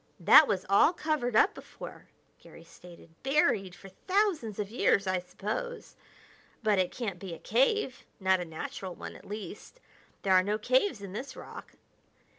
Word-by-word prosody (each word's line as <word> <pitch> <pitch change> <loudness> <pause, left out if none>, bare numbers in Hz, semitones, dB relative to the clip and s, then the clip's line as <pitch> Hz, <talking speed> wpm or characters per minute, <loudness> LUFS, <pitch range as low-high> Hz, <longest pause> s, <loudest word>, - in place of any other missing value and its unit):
"That 305 - +8
was 190 -3 -1
all 200 - +5
covered 305 -8 -1
up 395 - +5
before," - - -11 0.3
Garry - - -15
stated; 175 -2 -15
"buried 250 -10 +1
for 195 - -13
thousands 360 - 0
of 210 -1 -4
years, 200 -4 +2
I 185 -1 0
suppose. 210 - -5 0.7
But 210 -3 +3
it 185 - +2
can't 205 -8 -4
be 185 -4 -6
a - - -11
cave; 265 - +1 0.2
not 190 -1 +3
a 180 - -4
natural 175 +3 -6
one, - - -8
at - - -14
least. 210 - -8 0.4
There 190 - +3
are 185 - +7
no 205 +3 -1
caves 255 - +1
in 195 -2 -8
this 250 +7 -6
rock." - - -10
210 Hz, 165 wpm, -29 LUFS, 190-265 Hz, 0.7 s, That